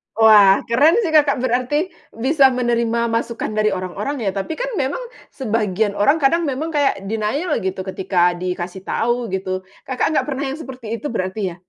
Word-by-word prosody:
Wah, 210 -3 +6
keren 285 - +4
sih 325 - -1
Kakak, 290 -4 +3
berarti 260 +8 0 0.2
bisa 270 +4 +4
menerima 235 -2 0
masukan 230 -1 -2
dari 215 0 +1
orang-orang 225 +8 -4
ya. 195 - 0
Tapi 195 +11 -4
kan - - -3
memang 280 - -2 0.2
sebagian 215 -4 -1
orang 280 +10 +2
kadang 335 +3 +3
memang 300 +5 -3
kayak 280 -10 +1
denial 225 - -1
gitu 190 0 -3
ketika 185 -2 +1
dikasih 180 +1 -5
tahu 240 +1 0
gitu. 185 -1 -3 0.2
Kakak 270 +4 -1
nggak - - +3
pernah 285 -1 -3
yang 270 - -3
seperti 250 -6 -6
itu 290 +2 -5
berarti 190 0 -3
ya? 170 - -10
235 Hz, 170 wpm, -20 LUFS, 195-280 Hz, 0.2 s, Wah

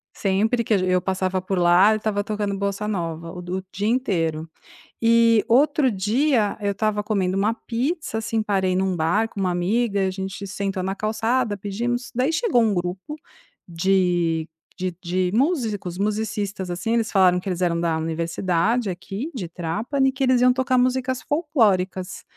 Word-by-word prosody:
sempre 215 +5 +1
que 225 - 0
a - - +4
g 185 - 0
eu 185 0 +2
passava 185 0 -1
por 190 +1 -2
lá 175 +4 +5
eu - - 0
estava 210 -1 -1
tocando 205 -1 -2
bossa 200 +1 -2
nova, 165 -4 -3
o 180 - -7
do 180 +1 -4
o - - -10
dia 200 +3 -2
inteiro. 165 -10 -1 0.5
E, 230 -1 +4
outro 280 +2 +4
dia 215 +3 +1
eu 200 -1 0
estava 210 0 -1
comendo 195 -3 0
uma 210 +3 +2
pizza, 250 +3 -3
assim, 225 0 -1
parei 190 -3 +1
num 190 0 0
bar 175 +7 +1
com 205 - -8
uma 185 -1 +1
amiga; 200 +3 0
a - - -1
gente 190 +1 -6
sentou 195 -1 -3
na 190 +1 -2
calçada, 225 +1 0
pedimos. 235 +5 -3
Daí 255 +5 +1
chegou 325 - +2
um 220 -2 +2
grupo 185 - -4 0.5
de 175 -2 +1 0.3
de 185 -1 -2
de 180 +1 0
músicos, 225 - 0
musicistas, 205 -2 -2
assim. 225 +6 -2
Eles 230 -1 0
falaram 185 -2 +4
que 185 - -6
eles 180 -1 -3
eram 170 -2 +1
da 165 -1 0
universidade, 170 +7 0
aqui 195 - -5
de 190 -8 -4
Trapani, 215 - -1
que 265 +1 -3
eles 255 -1 +3
iam 250 0 +5
tocar 255 0 +1
músicas 255 0 +1
folclóricas. 200 - 0
200 Hz, 175 wpm, -23 LUFS, 185-230 Hz, 0.5 s, lá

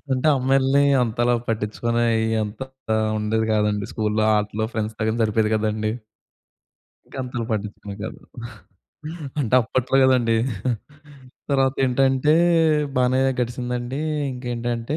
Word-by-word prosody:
అంటే 130 +3 0
అమ్మాయిల్ని 135 +1 +3 0.2
అంతలా 120 +1 +1
పట్టించుకునేయి 115 +1 0 0.2
అంత 105 +3 -8 0.6
ఉండేది 110 +1 0
కాదండి. 105 -1 +1
స్కూల్‌లో 110 0 0
ఆటలు 105 +1 -1
ఫ్రెండ్స్‌తో 110 0 -3
గాని 115 +2 -1
సరిపోయేది 110 0 +1
కదండీ. 110 0 -1 1.1
ఇంకా - - -13
అంతలా 125 -2 -4
పట్టిచుకునే 105 -1 -5
కాదు. 110 - -7 1.2
అంటే 125 -3 0
అప్పట్లో 130 +3 0
కదండి. 120 -3 +3 1.1
తర్వాత 135 0 +2
ఏంటంటే 135 +3 +2 0.6
బానే 130 +1 +2 0.2
గడిసిందండి. 125 +2 -3 0.3
ఇంకేంటంటే 120 +1 -3
115 Hz, 100 wpm, -22 LUFS, 110-130 Hz, 1.2 s, అమ్మాయిల్ని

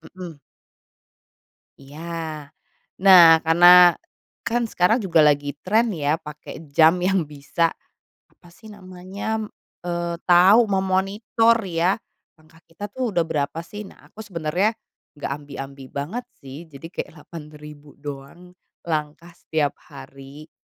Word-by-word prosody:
Mhm. 175 -5 -9 1.4
Iya. 155 +1 -8 0.6
Nah, 170 -4 +9
karena 175 +1 +7 0.5
kan 235 +1 -1
sekarang 215 +1 +1
juga 170 -4 +3
lagi 145 -1 +2
tren 220 +3 +1
ya 150 -1 -1
pakai 150 0 -11
jam 160 +3 +5
yang 185 +1 +1
bisa, 145 +3 -1 0.6
apa 175 - -23
sih 220 +6 -19
namanya, 195 +1 -6 0.5
eee, 170 -1 -3
tahu 190 +6 +6
memonitor 195 +4 +1
ya, 180 0 0 0.4
langkah 160 0 -23
kita 200 +5 -9
tuh 245 -3 -4
udah 170 - +2
berapa 150 -2 -3
sih? 210 +4 -9
Nah, - - -18
aku 220 0 -11
sebenarnya 180 +4 -1 0.4
nggak 145 - -6
ambi-ambi 140 -1 -8
banget 155 - -5 0.2
sih, 140 +5 -10
jadi 155 0 -12
kayak - - -6
8000 150 -2 -13
doang 145 +5 -10 0.3
langkah 155 +1 -4
setiap 155 -3 -3
hari. 140 +1 -14
170 Hz, 120 wpm, -22 LUFS, 150-190 Hz, 1.4 s, Nah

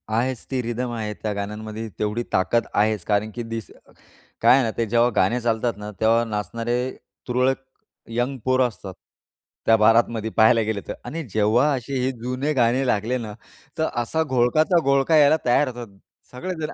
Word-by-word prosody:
आहेच 125 +1 -1
ती 130 -1 0
रिदम 120 +1 -3
आहे 105 -2 -3
त्या 105 0 -4
गाण्यांमध्ये. 105 +2 -5
तेवढी 105 +3 -1
ताकद 95 +6 +2
आहेच. 105 -2 +1
कारण 105 +1 +1
की 120 - -4
तीच 115 -2 -5 0.7
काय - - +7
आहे 135 - +3
ना, 115 - -1
ते 115 - +1
जेव्हा 120 +2 +3
गाणे 115 +7 +2
चालतात 115 -1 0
ना 105 0 -7
तेव्हा 115 +1 +3
नाचणारे 115 +2 -3 0.5
तुरळक 125 +2 +1 0.6
यंग 125 +3 -1
पोरं 130 0 +3
असतात 100 -4 -9 0.7
त्या 115 - +6
बारातमध्ये 115 0 +3
पाहायला 115 +1 +5
गेलं 110 -2 -2
तर - - -3
आणि 160 +7 -5
जेव्हा 110 +6 +3
असे 135 +1 -3
हे 130 +1 0
जुने 125 +5 -2
गाणे 125 0 +2
लागले 120 +2 0
ना, 110 -3 -6 0.4
तर 160 - +1
असा 160 +7 -1
घोळकाचा 150 +6 +2
घोळका 140 +3 +3
यायला 150 +1 +6
तयार 125 +4 +3
होतात. 120 -5 -8 0.3
सगळेच 175 +8 -5
जणं 155 - -3
120 Hz, 170 wpm, -23 LUFS, 110-130 Hz, 0.7 s, काय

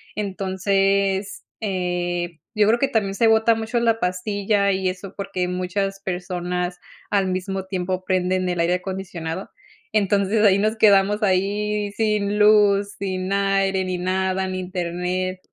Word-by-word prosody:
Entonces, 195 0 0 0.2
eh, 175 -4 -2
yo 210 -1 +3
creo 230 - +4
que 275 - +2
también 200 -3 0
se 230 - +2
bota 225 +1 +4
mucho 225 +2 -1
la 230 -1 +2
pastilla 200 +2 0
y 190 -1 0
eso, 185 +1 -7
porque 195 -2 -3
muchas 185 +2 -2
personas 180 -1 -3 0.3
al 195 -2 +1
mismo 190 +1 -3
tiempo 185 -1 -3
prenden 185 0 0
el 175 - -2
aire 170 +2 +2
acondicionado. 180 -2 -5 0.4
Entonces, 205 +1 +2
ahí 195 -1 +5
nos 215 +2 +1
quedamos 205 0 +4
ahí 205 +2 0
sin 210 -2 0
luz, 205 -1 +4
sin 185 -1 -3
aire, 195 -1 +1
ni 185 -1 -2
nada, 190 +1 -1
ni 185 0 -3
internet 180 0 -3
195 Hz, 140 wpm, -22 LUFS, 185-205 Hz, 0.4 s, ahí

